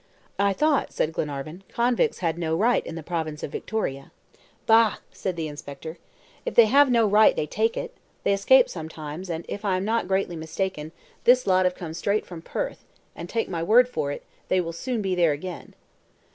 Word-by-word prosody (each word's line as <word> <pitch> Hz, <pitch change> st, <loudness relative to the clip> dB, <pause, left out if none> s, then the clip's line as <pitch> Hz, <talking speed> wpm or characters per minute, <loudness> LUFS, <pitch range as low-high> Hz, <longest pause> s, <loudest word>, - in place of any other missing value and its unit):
"I 200 Hz, 0 st, +3 dB
thought," 300 Hz, +6 st, +1 dB
said 160 Hz, -, -1 dB
Glenarvan, 155 Hz, +4 st, -4 dB
"convicts 240 Hz, 0 st, +1 dB
had 165 Hz, -1 st, +1 dB
no 160 Hz, -1 st, 0 dB
right 230 Hz, +8 st, +2 dB
in 165 Hz, -, -6 dB
the 165 Hz, -, -6 dB
province 160 Hz, -2 st, -4 dB
of -, -, -4 dB
Victoria." 135 Hz, -11 st, -4 dB, 0.5 s
"Bah!" 225 Hz, -2 st, +5 dB
said 185 Hz, -2 st, -4 dB
the 165 Hz, -2 st, -3 dB
inspector, 150 Hz, +2 st, -8 dB, 0.4 s
"if -, -, -4 dB
they 235 Hz, -, +8 dB
have 275 Hz, +5 st, +5 dB
no 235 Hz, -2 st, +4 dB
right, 210 Hz, +1 st, +5 dB
they -, -, -1 dB
take 220 Hz, +9 st, 0 dB
it! -, -, -4 dB, 0.3 s
They -, -, +3 dB
escape 245 Hz, +6 st, +5 dB
sometimes, 160 Hz, +1 st, -7 dB
and, 165 Hz, 0 st, -4 dB
if 205 Hz, -, -6 dB
I 190 Hz, -3 st, +1 dB
am 185 Hz, -, -2 dB
not 225 Hz, -2 st, 0 dB
greatly 190 Hz, -2 st, 0 dB
mistaken, 160 Hz, 0 st, -4 dB, 0.3 s
this 250 Hz, +1 st, +5 dB
lot 185 Hz, -1 st, +3 dB
have 180 Hz, 0 st, +1 dB
come 165 Hz, -3 st, -7 dB
straight 200 Hz, +5 st, -1 dB
from 170 Hz, -3 st, -9 dB
Perth, -, -, -4 dB, 0.3 s
and, 170 Hz, +1 st, -8 dB
take 225 Hz, -1 st, -1 dB
my 170 Hz, -3 st, -3 dB
word 230 Hz, +8 st, +5 dB
for 155 Hz, -, -2 dB
it, -, -, -6 dB, 0.2 s
they 185 Hz, -, +2 dB
will 170 Hz, -2 st, -3 dB
soon 230 Hz, +5 st, -3 dB
be 190 Hz, -1 st, 0 dB
there 170 Hz, -4 st, +3 dB
again." 175 Hz, +4 st, -8 dB
185 Hz, 200 wpm, -25 LUFS, 160-220 Hz, 0.5 s, they